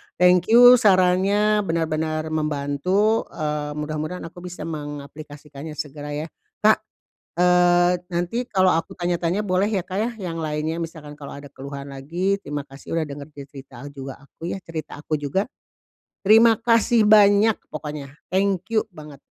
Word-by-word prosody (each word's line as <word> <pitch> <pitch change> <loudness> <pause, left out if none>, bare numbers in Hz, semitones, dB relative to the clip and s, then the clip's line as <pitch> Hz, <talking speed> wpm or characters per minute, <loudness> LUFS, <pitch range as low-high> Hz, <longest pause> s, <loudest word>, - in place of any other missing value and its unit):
Thank 180 0 +4
you 245 +1 +9
sarannya, 200 +1 +3
benar-benar 155 -1 -1
membantu, 155 +8 0
eee, 150 -2 -3
mudah-mudahan 155 +3 -4
aku - - -13
bisa 180 0 -7
mengaplikasikannya 145 0 -8
segera, 145 0 -6
ya. 150 +2 -4 0.3
Kak, 215 0 +4 0.6
eee, 180 0 +4
nanti 175 +9 -2
kalau 185 -1 +3
aku 165 - -2
tanya-tanya 175 +2 -1
boleh 190 +2 +1
ya, 195 -5 -1
Kak, 190 +1 -5
ya? 230 +3 0 0.2
Yang 165 - -5
lainnya 155 +1 -2
misalkan 155 -3 -8
kalau 140 0 -8
ada 140 0 -12
keluhan 140 +1 -8
lagi. 175 +9 -2
Terima 145 -3 -5
kasih 140 +4 -8
udah 160 - +1
denger 140 0 -8
ce 140 -1 -8
cerita 135 -1 -12
juga 135 -1 -8
aku 165 +4 -9
ya - - -4
cerita 155 -3 -7
aku 155 -1 -2
juga. 145 +8 -1 0.8
Terima 225 +3 +6
kasih 230 0 +3
banyak, 210 0 +6 0.2
pokoknya. 150 -2 -7 0.2
Thank 190 0 0
you, 215 - +3
banget. 150 -2 -11
165 Hz, 150 wpm, -23 LUFS, 150-190 Hz, 0.8 s, you